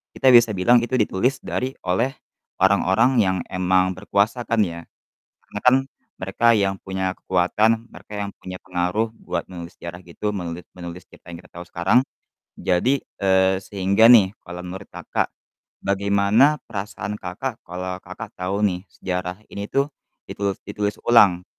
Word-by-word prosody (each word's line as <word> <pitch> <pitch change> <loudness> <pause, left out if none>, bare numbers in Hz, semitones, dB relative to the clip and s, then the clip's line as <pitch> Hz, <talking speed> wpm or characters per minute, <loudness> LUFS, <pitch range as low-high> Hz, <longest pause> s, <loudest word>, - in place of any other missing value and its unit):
kita 130 - +1
bisa 120 -2 +7
bilang 105 +5 +4
itu 130 +2 -1
ditulis 120 +6 +1
dari 130 +1 -2 0.2
oleh 115 +9 +1 0.5
orang-orang 100 +5 +4
yang 95 0 +1
emang 95 0 +2
berkuasa 105 +5 0
kan 115 -1 +1
ya. 85 -2 -5 0.6
Karena - - -7
kan 125 0 +7 0.5
mereka 95 +5 -1
yang 95 -2 +1
punya 95 -1 -2
kekuatan, 110 +6 +1
mereka - - -14
yang 100 - -4
punya 95 0 -7
pengaruh 95 +5 -1
buat - - -3
menulis 85 -1 -8
sejarah 85 +1 -7
gitu, 105 +5 -3
menulit 85 -2 -5
menulis 90 0 -8
cerita - - -18
yang 85 - -7
kita - - -20
tahu 85 +1 -9
sekarang. 95 +8 +2 0.6
Jadi, 125 +10 +1 0.2
eee, 95 -1 +3
sehingga 100 +2 +2
nih 100 -6 +7
kalau 90 0 -7
menurut 95 +2 -8
Kakak, - - -2 0.6
bagaimana 100 +8 +3
perasaan 105 +1 -5
Kakak 110 +7 -5
kalau 90 +1 -5
Kakak - - -9
tahu 95 +3 -1
nih 90 -2 -1
sejarah 90 +1 -4
ini 100 +1 -5
tuh 140 0 +2 0.4
ditulus 100 -1 -2
ditulis 105 0 -2
ulang 95 -7 +5
95 Hz, 150 wpm, -22 LUFS, 90-110 Hz, 0.6 s, bisa